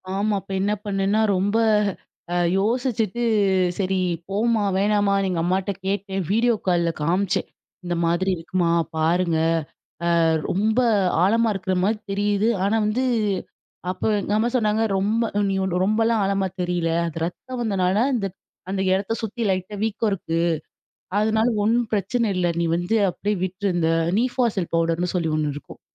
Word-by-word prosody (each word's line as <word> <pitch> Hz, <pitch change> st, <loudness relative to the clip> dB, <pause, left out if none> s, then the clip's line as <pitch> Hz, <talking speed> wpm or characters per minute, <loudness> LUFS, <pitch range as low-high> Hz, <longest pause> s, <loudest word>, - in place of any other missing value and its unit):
ஆமா. 210 Hz, +2 st, 0 dB
அப்ப -, -, -13 dB
என்ன 205 Hz, +2 st, +1 dB
பண்ணேன்னா, 200 Hz, +1 st, +1 dB
ரொம்ப 200 Hz, +4 st, +1 dB, 0.8 s
அ -, -, 0 dB, 0.2 s
யோசிச்சுட்டு 230 Hz, 0 st, 0 dB, 0.6 s
சரி 190 Hz, -1 st, 0 dB, 0.3 s
போமா! 215 Hz, +2 st, +1 dB
வேணாமான்னு 200 Hz, 0 st, +2 dB
எங்க 180 Hz, -2 st, -1 dB
அம்மாகிட்ட 185 Hz, +3 st, 0 dB
கேட்டேன். 195 Hz, 0 st, -2 dB
வீடியோ 230 Hz, +2 st, +3 dB
கால்ல 170 Hz, -2 st, +2 dB
காமிச்சேன். 180 Hz, +5 st, 0 dB, 0.4 s
இந்த 175 Hz, -1 st, -2 dB
மாதிரி 170 Hz, +3 st, +1 dB
இருக்குமா! 170 Hz, +1 st, -1 dB, 0.3 s
பாருங்க. 165 Hz, +1 st, +1 dB, 0.8 s
அ -, -, +4 dB, 0.3 s
ரொம்ப 215 Hz, +5 st, +1 dB, 0.4 s
ஆழமா 225 Hz, +4 st, +3 dB
இருக்குறமாரி 190 Hz, +2 st, 0 dB
தெரியுது, 205 Hz, +2 st, +1 dB
ஆனா 200 Hz, +3 st, +2 dB
வந்து 215 Hz, +5 st, 0 dB, 0.9 s
அப்ப 185 Hz, -, -9 dB, 0.2 s
எங்க 205 Hz, -, -2 dB
அம்மா 225 Hz, +2 st, +1 dB
சொன்னாங்க 215 Hz, -2 st, +2 dB
ரொம்ப 210 Hz, +4 st, +1 dB, 0.3 s
நீ -, -, 0 dB, 0.3 s
ரொம்பலாம் 225 Hz, +2 st, +2 dB
ஆழமா 195 Hz, 0 st, 0 dB
தெரியல. 175 Hz, -1 st, -1 dB, 0.2 s
அது 165 Hz, 0 st, -4 dB
ரத்தம் 250 Hz, +8 st, -6 dB
வந்தனால, 190 Hz, -3 st, +1 dB, 0.2 s
இந்த 205 Hz, -5 st, -1 dB, 0.4 s
அந்த 190 Hz, 0 st, -1 dB
இடத்த 195 Hz, +3 st, -1 dB
சுத்தி 225 Hz, +2 st, -5 dB
லைட்டா 185 Hz, +2 st, -2 dB
வீக்கம் 220 Hz, 0 st, 0 dB
இருக்கு. 165 Hz, -4 st, -2 dB, 0.8 s
அதனால 220 Hz, +2 st, +2 dB, 0.2 s
ஒன்னும் 230 Hz, +1 st, +1 dB
பிரச்சன 215 Hz, +3 st, 0 dB
இல்ல. 180 Hz, -1 st, +1 dB
நீ 170 Hz, -, +1 dB
வந்து 175 Hz, +6 st, 0 dB
அப்பிடியே 205 Hz, +3 st, -2 dB
விட்ரு. 190 Hz, +2 st, -3 dB
இந்த 165 Hz, -1 st, +1 dB, 0.3 s
நீஃபாசல் 235 Hz, -6 st, 0 dB
பவுடர் 165 Hz, 0 st, +1 dB
னு 180 Hz, -, -1 dB
சொல்லி 170 Hz, -3 st, 0 dB
ஒன்னு 150 Hz, -1 st, 0 dB
இருக்கும். 145 Hz, -, -11 dB
195 Hz, 140 wpm, -23 LUFS, 180-220 Hz, 0.9 s, அ